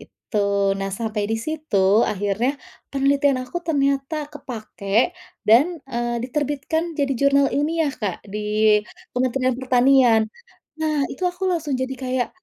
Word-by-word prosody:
Gitu. 200 -2 -1
Nah 195 - -2
sampai 215 +1 -2
di 225 - +1
situ, 225 -7 +1
akhirnya 205 +5 0 0.4
penelitian 275 0 +2
aku 255 +8 -4
ternyata 285 -1 0
kepakai 230 - -1 0.4
dan, 290 +11 +5
eee, 240 -1 -2
diterbitkan 295 +4 -2
jadi 275 -1 +1
jurnal 280 0 +4
ilmiah, 300 +1 +1
Kak, 205 -3 -4
di 210 0 +2 0.3
Kementerian 255 +1 +1
Pertanian. 255 -3 +4 0.6
Nah, 310 -1 0
itu 370 - -6
aku 360 +2 -7
langsung 320 -5 -1
jadi 260 +1 -2
kayak 255 -1 -2
260 Hz, 125 wpm, -22 LUFS, 220-290 Hz, 0.6 s, dan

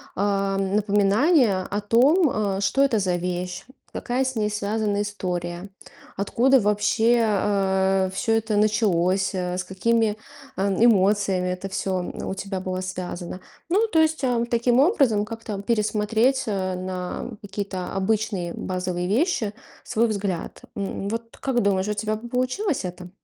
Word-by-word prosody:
а, 195 0 0
напоминание 205 - +2
о 205 +1 -2
том, 270 - +4
а: 200 -2 -1
что 275 +7 +2
это 240 -6 +2
за 185 -2 0
вещь, 180 0 -4 0.3
какая 255 +2 -1
с 260 -1 -2
ней 210 -1 0
связана 210 0 -1
история, 180 -2 -4 0.5
откуда 250 +6 +3
вообще, 220 +3 +2
а, 190 -2 +1
всё 225 +3 0
это 220 -1 0
началось, 195 -3 +2
э, 180 0 -2
с 185 - -2
какими, 215 +3 +1 0.4
а, 195 +1 +1
эмоциями 195 -3 +3
это 180 +2 -4
всё, 190 -1 -1
м, 180 - -5
у - - -2
тебя 195 -1 -4
было 185 0 -3
связано. 185 -1 -5 0.3
Ну, 425 +6 +3
то 330 -6 +2
есть, 315 -2 +2
а, 240 -2 +1
таким 240 +1 +3
образом 275 - +3
как-то 220 -3 -6
пересмотреть, 220 +4 +1
а, 185 -3 -1
на 185 +4 -5
какие-то 195 -2 -5
обычные 195 -3 -1
базовые 180 -1 -3
вещи 230 - +1 0.3
свой 235 -1 +1
взгляд. 200 -5 -3
М, 200 0 -4
вот 230 +2 -5
как 255 -3 0
думаешь, 195 0 +1
у 210 - 0
тебя 215 +1 -2
бы 235 +3 -8
получилось 255 - -1
это? 180 0 -7
205 Hz, 145 wpm, -24 LUFS, 190-230 Hz, 0.5 s, том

